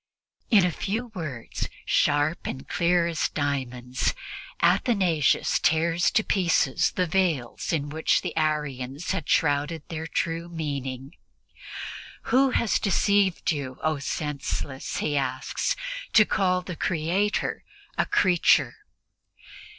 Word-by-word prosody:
In 205 -6 +6
a 180 - +1
few 225 +7 -3
words, 145 - -5 0.2
sharp 145 +3 +1
and 130 - -6
clear 175 0 +2
as 170 -2 0
diamonds, 130 -3 -2 0.4
Athanasius 180 - +2
tears 165 +2 +2
to 220 - +2
pieces 170 -10 +2
the 180 - +1
veils 165 -9 0
in 150 -4 -1
which 160 +2 +1
the - - -4
Arians 150 -1 -2
had 155 - -3
shrouded 145 +1 +1
their 160 -1 -4
true 165 +1 -2
meaning. 140 -5 -4 1.2
"Who 265 +1 +5
has 235 -3 +1
deceived 200 -2 +2
you, 140 -4 -4
O 155 -2 +1
senseless," 140 -2 -3
he 145 - -1
asks, 130 -1 -1 0.4
"to 215 - +7
call 185 -2 +1
the 180 -1 -6
Creator 180 +6 -1 0.3
a - - +1
creature?" 180 -3 +3
160 Hz, 115 wpm, -26 LUFS, 140-180 Hz, 1.2 s, to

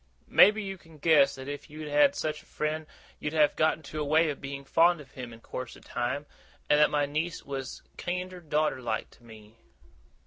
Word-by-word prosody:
Maybe 210 +2 +7
you 195 -1 -6
can 165 -2 -17
guess 145 -2 +4
that 130 0 -9
if 145 +2 -6
you'd 155 +1 -7
had 285 - +4
such 155 -1 -2
a - - -23
friend, 155 0 -3 0.3
you'd 150 - -3
have 150 -2 +4
got 155 0 +3
into 155 0 -7
a - - +1
way 155 +2 +3
of 140 - -8
being 140 0 -6
fond 170 +4 +4
of 140 -3 -13
him 125 -2 -8
in 115 0 -13
course 130 0 -6
of - - -17
time, 125 +4 -2 0.4
and 150 - +4
that 150 - +6
my 145 -1 +1
niece 155 +4 -3
was 135 -2 -6 0.2
kiender 180 +1 -3
daughter 150 -4 0
like 115 -3 -3
to - - -21
me. 110 -1 -15
150 Hz, 210 wpm, -29 LUFS, 135-160 Hz, 0.4 s, Maybe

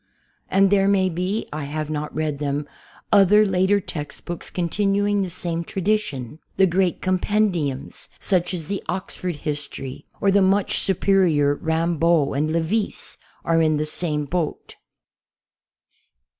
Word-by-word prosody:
And 195 0 +4
there 195 -1 +4
may 190 -2 +3
be 185 +5 -2
(I 150 -1 -4
have 155 +1 -4
not 150 0 -3
read 155 -2 -2
them) 145 0 -2 0.5
other 205 +1 +6
later 190 +1 +2
textbooks 170 0 -6
continuing 200 +3 +1
the 190 - -2
same 170 -1 -2
tradition. 175 - -2 0.2
The 190 - +6
great 185 0 0
compendiums, 185 -7 0
such 180 -3 +1
as 170 -4 -4
the 200 +4 -3
"Oxford 180 -1 -3
History," 145 -3 -5
or 200 - +3
the 200 +1 +4
much 195 +1 +2
superior 180 -7 +3
Rambaud 160 -1 +1
and 150 +2 0
Lavisse, 170 +7 -2 0.3
are 165 0 +3
in 155 -1 +2
the 150 - -1
same 150 -1 -2
boat. 165 0 -3
175 Hz, 130 wpm, -23 LUFS, 155-195 Hz, 0.5 s, other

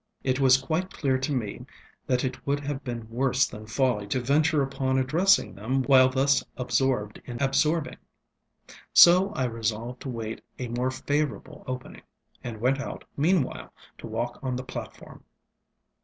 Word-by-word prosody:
It 130 0 0
was 130 -1 +6
quite 160 +7 -2
clear 135 -3 0
to 130 +3 -2
me 115 -7 -3 0.4
that 125 -1 +1
it 130 0 -5
would 145 +1 0
have 140 -1 -4
been 120 -3 -5
worse 130 +3 +1
than 110 0 -9
folly 110 -3 0
to 130 - 0
venture 145 +4 +2
upon 135 -1 -1
addressing 165 +10 +3
them 125 +7 -1
while 130 -1 +6
thus 135 +1 +2
absorbed 125 -4 0
in 120 -1 -7
absorbing. 150 +4 +1 1.0
So 180 +3 +8
I 130 - -1
resolved 115 +1 -3
to 135 - -6
await 115 -2 -5 0.2
a 125 -2 -5
more 125 +2 -1
favorable 145 +3 -3
opening, 130 0 -6 0.4
and 115 -3 -6
went 130 +4 +1
out 135 - -6
meanwhile 155 -1 0 0.3
to - - -8
walk 115 +2 -3
on 130 -2 -2
the 125 - -4
platform. - - -9
130 Hz, 155 wpm, -26 LUFS, 120-140 Hz, 1.0 s, So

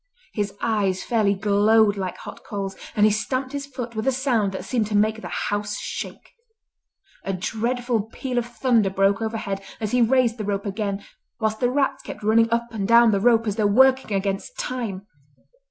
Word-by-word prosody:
His 205 -2 -2
eyes 200 -5 0
fairly 215 -4 +2
glowed 205 +1 +3
like 190 -2 -4
hot - - -10
coals, 195 -2 -5 0.2
and 210 - +5
he 215 - +5
stamped 255 +5 -2
his 280 0 -5
foot 245 -4 -6
with 220 +3 -2
a - - +5
sound 245 -6 +1
that 190 - -6
seemed 230 -5 0
to 210 -1 0
make 215 +1 +1
the - - -6
house 205 0 -2
shake. - - -7 0.9
A 195 - -2
dreadful 225 +3 -1
peal 255 -2 -2
of 240 - -4
thunder 235 -3 +2
broke 195 +2 +2
overhead 220 -3 -3 0.2
as 215 -2 -3
he 250 - +3
raised 240 -1 +3
the - - -2
rope 200 0 -2
again, 200 -1 -3 0.3
whilst 220 -1 -1
the 245 - +2
rats 270 0 0
kept - - -9
running 225 +2 +4
up 235 0 0
and 205 -4 -3
down 235 0 +6
the 200 - +2
rope 230 +1 +4
as 210 -1 -2
though 215 -2 +3
working 260 -1 +4
against 195 - -3
time. 235 - -4
220 Hz, 190 wpm, -23 LUFS, 200-240 Hz, 0.9 s, down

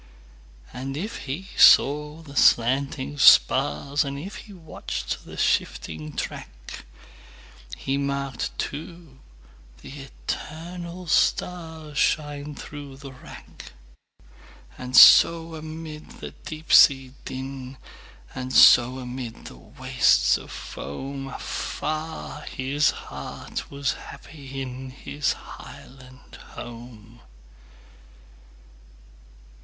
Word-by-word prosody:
And 135 +2 -5
if 205 -2 -5
he 185 +8 -5
saw 150 +3 +5
the 140 -2 -13
slanting 135 +4 +2
spars, 75 - +5
And 140 -1 -5
if 190 +9 -7
he 215 - -12
watched 165 -4 -6
the - - -11
shifting 80 -1 -1
track, - - -7 0.9
He 135 +1 -2
marked, 140 -3 -3
too, 155 -2 -7 0.6
the - - -11
eternal 170 +5 -7
starsShine 150 -4 -1
through 145 -2 -9
the 140 -1 -10
wrack. 130 - -13 1.0
And 125 -1 -2
so 165 +4 +8
amid 155 0 -8
the - - -7
deep 155 0 -6
sea 135 -2 +6
din, 130 0 -7 0.6
And 130 0 -5
so 125 0 +7
amid 125 -2 -7
the - - -10
wastes - - +2
of - - -7
foam, 135 - -7
Afar 155 +3 -5
his 140 +3 +1
heart 70 - -7
was 140 -1 -1
happy 135 -3 -9
inHis 130 +3 -4
highland 130 0 -13 0.2
home! 120 -1 -11
140 Hz, 90 wpm, -24 LUFS, 130-155 Hz, 1.0 s, so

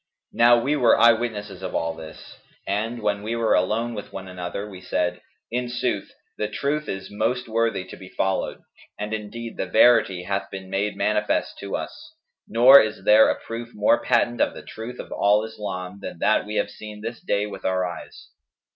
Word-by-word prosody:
Now 120 +1 +6
we 140 +5 0
were 125 -5 +4
eye 115 0 +8
witnesses 105 -5 -4
of 95 - -5
all 80 0 0
this; 80 -1 -11 0.3
and, 110 +4 -2
when 100 -1 0
we 110 +3 -3
were 115 -1 +2
alone 110 +6 +1
with 105 -2 -7
one 95 0 -7
another, 90 +2 -5
we 95 -3 -10
said, 90 -1 -1 0.3
'In 125 +1 -2
sooth, 120 -4 -2 0.3
the 105 - 0
truth 145 +7 -2
is 95 0 -5
most 115 +4 -1
worthy 115 -4 0
to 95 - -10
be 95 -1 -12
followed;'[FN#211] 95 0 -2 0.3
and 105 +1 -4
indeed 110 +2 -6
the - - -2
verity 95 -7 +4
hath 100 +2 -2
been 95 -1 -8
made 100 +2 -1
manifest 105 0 0
to - - -4
us, - - -7 0.3
nor 130 +5 +8
is 110 -2 -3
there 105 +2 +7
a - - -1
proof 115 +1 -7
more 105 +3 +3
patent 120 0 +2
of - - +1
the - - -9
truth 115 +3 -8
of - - -8
al 105 +1 +3
Islam 100 -4 -6
than - - -7
that 105 +3 +2
we 105 - -5
have - - 0
seen 105 -1 -10
this 115 +1 -5
day 100 0 0
with 100 -2 -8
our 95 -1 +1
eyes.' 90 -1 -9
105 Hz, 195 wpm, -24 LUFS, 95-115 Hz, 0.3 s, eye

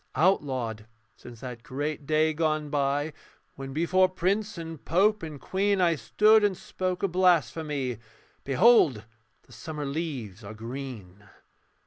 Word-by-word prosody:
Outlawed: 130 - 0 0.3
since 120 -2 -13
that 125 -3 -7
great 145 +2 -4
day 155 0 +2
gone 155 -2 -1
by 145 +1 0 0.4
When 135 0 -8
before 180 +5 +3
prince 195 +3 -1
and 165 -3 -7
pope 210 +5 +2
and 155 -3 -7
queen 200 +4 0
I 175 -2 +4
stood 210 - +4
and 200 -3 +1
spoke 185 0 -4
a - - +4
blasphemy 155 - +1 0.4
'Behold 140 - +4 0.4
the - - -23
summer 150 +5 -6
leaves 135 - -4
are 105 +2 -8
green.' 115 -5 -8
150 Hz, 130 wpm, -27 LUFS, 130-180 Hz, 0.4 s, I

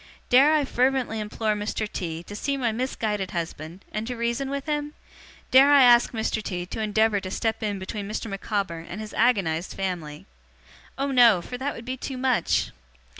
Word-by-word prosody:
Dare 280 +5 +6
I 295 -2 +2
fervently 255 -3 0
implore 215 +1 -1
Mr. 210 +1 -3
T. 165 -4 -5
to 205 - -9
see 275 +6 -2
my 240 -4 0
misguided 220 -4 -2
husband, 170 +1 -6
and 215 +1 -4
to 250 - -3
reason 235 +4 -1
with 280 0 -4
him? 295 -1 -3 0.6
Dare 270 +2 +7
I 280 -2 +7
ask 240 -1 +6
Mr. 220 -1 -2
T. 180 -4 -4
to 205 - -5
endeavour 215 0 +2
to 185 - -6
step 220 +3 -2
in 205 -2 -2
between 200 +2 -6
Mr. 215 +1 -4
Micawber 195 -4 -3
and 175 +4 -8
his 215 -1 -7
agonized 190 -8 +1
family? 175 -6 -4 0.7
Oh 275 +1 -1
no, 240 -7 +6
for 210 +8 -7
that 280 +2 -2
would 230 - -9
be 255 +1 -4
too 260 +1 -5
much! 255 -1 +1
220 Hz, 185 wpm, -25 LUFS, 195-255 Hz, 0.7 s, Dare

